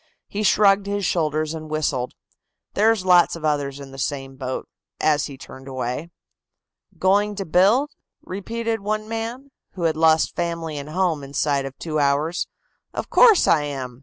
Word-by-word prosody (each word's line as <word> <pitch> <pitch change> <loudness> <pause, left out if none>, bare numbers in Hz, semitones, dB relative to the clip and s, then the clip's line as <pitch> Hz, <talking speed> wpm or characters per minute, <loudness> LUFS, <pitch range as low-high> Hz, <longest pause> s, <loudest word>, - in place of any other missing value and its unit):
He 205 - -4
shrugged 200 -1 +4
his 200 -1 -1
shoulders 155 -2 0
and 155 -1 -7
whistled. 145 -5 -1 0.6
"There's 215 -2 +3
lots 180 -2 +5
of 165 -2 -6
others 145 -2 -1
in 140 -1 -10
the 135 - -10
same 135 -1 -3
boat," 130 -1 -4 0.3
as 150 -2 +2
he 140 -3 -10
turned 130 0 -12
away. 130 +4 -4 0.9
"Going 205 +2 +2
to 195 -1 -4
build?" 205 - +3 0.3
repeated 225 +4 -3
one 215 +1 -2
man, 230 +5 -5 0.2
who 180 - -5
had 160 -2 +2
lost 160 0 +3
family 165 -2 -3
and 145 +1 -6
home 165 -3 0
inside 140 0 0
of 135 0 -8
two 155 -2 -2
hours. 145 +4 +1 0.5
"Of - - -4
course, 450 -6 +6
I 155 - +4
am. 130 -4 -6
160 Hz, 165 wpm, -23 LUFS, 140-200 Hz, 0.9 s, course